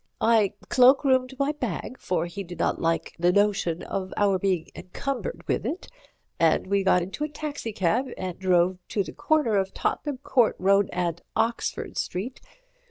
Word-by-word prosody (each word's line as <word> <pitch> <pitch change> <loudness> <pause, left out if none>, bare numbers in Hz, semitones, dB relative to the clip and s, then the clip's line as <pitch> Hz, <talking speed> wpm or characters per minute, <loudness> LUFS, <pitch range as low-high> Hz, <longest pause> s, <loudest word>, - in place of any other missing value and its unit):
"I 220 -4 +3
cloak 260 +3 +5
roomed 260 -1 +2
my 280 +2 +1
bag, 250 - -5
for 170 -2 -1
he 185 +4 -6
did 175 -1 -9
not - - 0
like 165 0 0
the 175 +1 +4
notion 200 -4 +1
of 190 -1 -4
our 200 -2 +3
being 180 -4 0
encumbered 275 - -5
with - - 0
it, 350 - -4 0.5
and 165 -1 +3
we 200 +1 +1
got 180 -2 +4
into 195 +11 -5
a 305 - -2
taxicab 265 - -2
and 185 -2 -5
drove 180 -1 +2
to 200 - 0
the - - -9
corner 300 -10 +2
of 190 0 -1
Tottenham 290 -3 -2
Court 250 -3 +2
Road 195 +1 +3
and 170 -2 -2
Oxford 225 +1 -1
Street. 220 +9 -4
200 Hz, 165 wpm, -26 LUFS, 180-255 Hz, 0.5 s, cloak